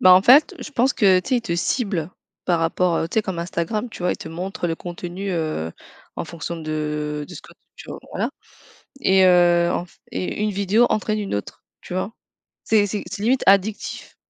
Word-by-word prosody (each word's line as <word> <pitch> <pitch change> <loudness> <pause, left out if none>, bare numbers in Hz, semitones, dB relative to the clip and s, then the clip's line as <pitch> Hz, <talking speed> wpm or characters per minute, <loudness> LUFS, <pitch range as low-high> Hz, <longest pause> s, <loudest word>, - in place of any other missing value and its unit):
Bah 185 - +8
en 185 - +8
fait, 270 +8 +6
je - - -7
pense 265 -1 +2
que 190 -6 +4
tu - - -10
sais 255 - +3
ils - - +1
te 170 -7 -2
ciblent 185 - -1 0.3
par 175 -2 +2
rapport, 165 +1 +1
heu, 165 - -1
tu - - -8
sais 220 - +3
comme 190 -4 -4
Instagram, 175 +7 -2
tu 220 - -10
vois? 180 - +2
Ils - - -5
te - - -8
montrent, 180 +3 -5
heu, 175 - +2
le 165 - 0
contenu, 175 +3 -6
heu, 155 - -2 0.5
en - - -3
fonction 170 +1 -6
de, 150 -1 -3
heu, 145 - -9
ce - - -8
que - - -16 0.2
tu - - -12 0.2
voilà. - - -2 0.7
Et 190 -4 +4
heu, 175 -1 +5
enf 175 0 -5
et 185 - -3
une 210 - +1
vidéo 200 +4 +3
entraîne 215 0 0
une 200 - -2
autre, 100 - -6 0.2
tu - - -8
vois? 185 +4 -2 0.5
C'est 210 -2 +3
c'est 205 +1 -3
c'est 200 +1 -5
limite 255 +3 +2
addictif. 200 +2 +1
185 Hz, 215 wpm, -22 LUFS, 170-210 Hz, 0.7 s, Bah